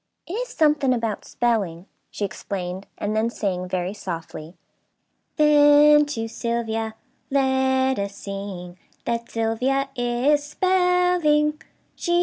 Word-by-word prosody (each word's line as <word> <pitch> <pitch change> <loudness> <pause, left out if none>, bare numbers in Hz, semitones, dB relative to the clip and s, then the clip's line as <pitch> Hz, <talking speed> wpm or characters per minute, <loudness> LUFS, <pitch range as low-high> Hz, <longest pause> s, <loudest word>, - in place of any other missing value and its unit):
"It 345 - -7
is - - -2
something 295 - +2
about 225 -3 -3
'spelling,'" 200 -8 -1 0.2
she 205 - -3
explained, 185 0 -5
and 210 +1 -2
then 220 +1 +1
sang, 185 -5 -3
very 185 +1 -2
softly: 165 -3 -7 0.8
"'Then 295 0 +6
to 225 -6 -3
Sylvia 225 -1 -3 0.3
let 265 -1 +2
us 200 0 -3
sing, 195 -3 -7 0.3
That 235 0 -2
Sylvia 250 +5 0
is 245 +4 +1
spelling. 360 -3 +2
235 Hz, 110 wpm, -23 LUFS, 200-295 Hz, 0.8 s, Then